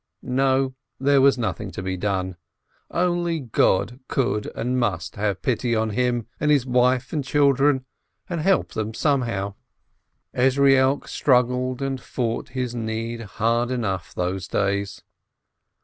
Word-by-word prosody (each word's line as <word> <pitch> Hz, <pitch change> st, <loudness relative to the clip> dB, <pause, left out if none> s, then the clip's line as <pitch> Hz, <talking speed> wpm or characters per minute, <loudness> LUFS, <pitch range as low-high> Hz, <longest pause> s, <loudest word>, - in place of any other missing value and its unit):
No, 130 Hz, +1 st, +1 dB, 0.3 s
there 140 Hz, +1 st, +4 dB
was 135 Hz, 0 st, +5 dB
nothing 110 Hz, -3 st, -3 dB
to 95 Hz, -, -5 dB
be 95 Hz, 0 st, -2 dB
done. 95 Hz, -1 st, -2 dB, 0.5 s
Only 175 Hz, -1 st, 0 dB
God 115 Hz, -2 st, +1 dB
could 115 Hz, -5 st, 0 dB
and 125 Hz, +2 st, -1 dB
must 95 Hz, -8 st, -1 dB
have 100 Hz, -2 st, -2 dB
pity 120 Hz, -1 st, 0 dB
on 110 Hz, 0 st, 0 dB
him 120 Hz, 0 st, 0 dB
and 150 Hz, -, +1 dB
his 145 Hz, -4 st, +4 dB
wife 125 Hz, +1 st, +2 dB
and 150 Hz, -3 st, 0 dB
children, 140 Hz, -1 st, +3 dB, 0.4 s
and 170 Hz, -4 st, -3 dB
help 190 Hz, +3 st, +2 dB
them 110 Hz, 0 st, -3 dB
somehow. 115 Hz, -9 st, 0 dB, 0.8 s
Ezrielk 135 Hz, +1 st, +3 dB
struggled 125 Hz, 0 st, +1 dB
and 135 Hz, -2 st, -2 dB
fought 115 Hz, -2 st, -3 dB
his 125 Hz, -2 st, -3 dB
need 115 Hz, 0 st, -3 dB
hard 115 Hz, +3 st, 0 dB
enough 105 Hz, -8 st, -3 dB
those 90 Hz, +1 st, -2 dB
days. 100 Hz, 0 st, -1 dB
125 Hz, 135 wpm, -23 LUFS, 105-135 Hz, 0.8 s, was